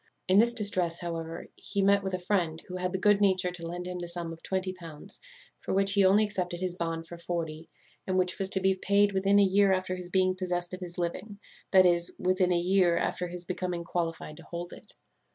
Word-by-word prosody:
"In 190 +2 +5
this 235 +2 +4
distress, 185 -6 +2
however, 165 -1 -5
he 200 - -2
met 200 +1 +4
with 190 -1 -2
a - - -2
friend, 175 -4 -1
who 185 - -5
had 180 0 -2
the 190 - -1
good 205 +1 +3
nature 185 -2 +3
to 170 -2 -6
lend 175 +1 -5
him 180 0 -5
the 175 - -5
sum 170 -1 -4
of 165 - -13
twenty 185 0 -2
pounds, 170 0 -8 0.4
for - - -3
which 195 0 +4
he 200 0 +4
only 195 +3 +5
accepted 180 -4 -2
his 185 -1 -2
bond 165 -2 -3
for 170 +1 -10
forty, 165 -2 -4 0.4
and 185 0 0
which 180 -1 +1
was 190 -1 -1
to 190 - +2
be 190 0 +3
paid 200 +2 +2
within 195 +1 +3
a 205 - +6
year 195 +1 +4
after 185 -1 0
his 180 -1 -7
being 185 0 +2
possessed 180 -1 -3
of 185 - -5
his 175 -2 -8
living; 185 +4 -4 0.3
that 185 -1 +6
is, 175 -1 +2
within 185 0 +1
a 175 - +3
year 180 0 +3
after 180 - -1
his 175 0 -7
becoming 180 -1 -3
qualified 165 -3 -3
to - - -12
hold 175 0 -6
it. - - -10
180 Hz, 230 wpm, -29 LUFS, 175-190 Hz, 0.4 s, a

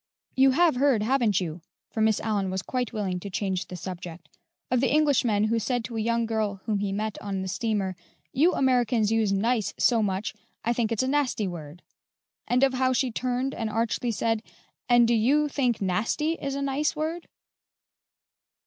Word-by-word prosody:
You 265 +1 +6
have 335 -6 +4
heard, 260 -5 +3
haven't 230 -4 +2
you" 170 -2 -5 0.3
for 220 - -2
Miss 220 -1 +3
Aliyn 205 -3 -1
was 190 0 -3
quite 250 -3 -2
willing 190 -4 -2
to 200 - -7
change 190 -1 -2
the 180 - -7
subject 175 -1 -8 0.4
"of 250 -1 +3
the 265 - +2
Englishman 270 -8 +3
who 230 +1 +1
said 245 +1 -1
to 235 - -7
a 220 - -1
young 235 +1 +1
girl 215 -3 -1
whom 210 -2 0
he 200 -1 -1
met 210 +1 -3
on 195 -2 -3
the - - -4
steamer, 200 -2 -1 0.4
'You 330 +7 +3
Americans 240 -4 +2
use 225 -3 +2
nice 220 +2 0
so 235 -3 +3
much, 200 0 -1 0.3
I 235 - +2
think 235 -2 -1
it's 230 +2 +1
a - - -1
nasty 265 -7 0
word;' 165 -1 -8 0.6
and 250 +2 +2
of 270 -1 +4
how 255 0 +2
she 255 0 +1
turned 255 +3 -1
and 225 - -3
archly 230 +2 -1
said, 225 0 0 0.5
'And 240 -1 +6
do 235 - +3
you 275 +7 +3
think 255 -5 0
nasty 210 - 0
is 280 -4 -3
a 280 - -2
nice 275 +2 0
word?'" 320 +3 -3
225 Hz, 190 wpm, -26 LUFS, 205-255 Hz, 0.6 s, You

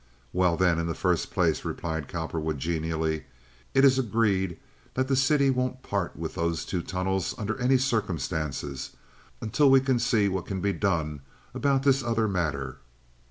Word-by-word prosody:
"Well, 90 -2 +2
then, 90 -3 +3
in 85 - -1
the 80 - -2
first - - 0
place," - - +1
replied 80 -3 -3
Cowperwood, 80 -1 -3
genially, 80 0 -1 0.5
"it 135 +1 +6
is 130 -1 +5
agreed 100 -7 +1 0.4
that 130 0 +1
the 135 - +2
city 135 +1 +4
won't 130 0 -2
part 100 -3 -2
with - - -4
those 85 0 -1
two 90 - -2
tunnels 95 +1 -2
under 110 -1 -2
any 130 +2 +4
circumstances 80 - -2 0.5
until 135 +6 +3
we 135 0 +7
can 130 -2 +1
see 115 -4 +2
what 95 -3 -2
can 95 -2 -3
be 100 +1 0
done 80 -8 -1 0.3
about 135 -1 +1
this 135 -1 +4
other 115 -2 +1
matter?" 75 -9 -2
95 Hz, 160 wpm, -27 LUFS, 80-125 Hz, 0.5 s, we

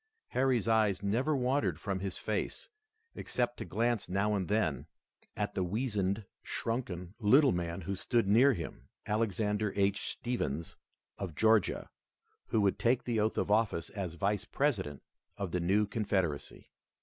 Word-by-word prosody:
Harry's 130 -4 +1
eyes 110 -4 +3
never 125 +10 +1
wandered 125 - +1
from 95 +1 -2
his 95 -1 -4
face, - - -3 0.4
except 120 -1 -2
to - - -5
glance 115 +5 0
now 100 +3 +1
and 95 -4 -1
then 105 -9 0 0.5
at 105 -1 -1
the 95 - 0
weazened, 100 0 -1 0.2
shrunken, 95 -7 -3
little 130 +6 +6
man 85 +1 -2
who 95 +3 -3
stood 115 +3 +1
near 125 +7 +6
him, 85 -7 -7 0.2
Alexander 105 -1 0
H. 100 +1 +2
Stephens 85 - -3 0.4
of 90 -6 -4
Georgia, 110 +2 +3 0.6
who 110 - +2
would 100 -1 +2
take 120 +1 +2
the 115 -3 0
oath 110 +1 +1
of - - 0
office 105 -6 +1
as 95 -5 -4
Vice 100 +4 0
President 100 - -1 0.3
of 100 -3 -3
the 90 - 0
new 100 +5 +3
Confederacy. 95 -8 -2
105 Hz, 150 wpm, -32 LUFS, 95-115 Hz, 0.6 s, little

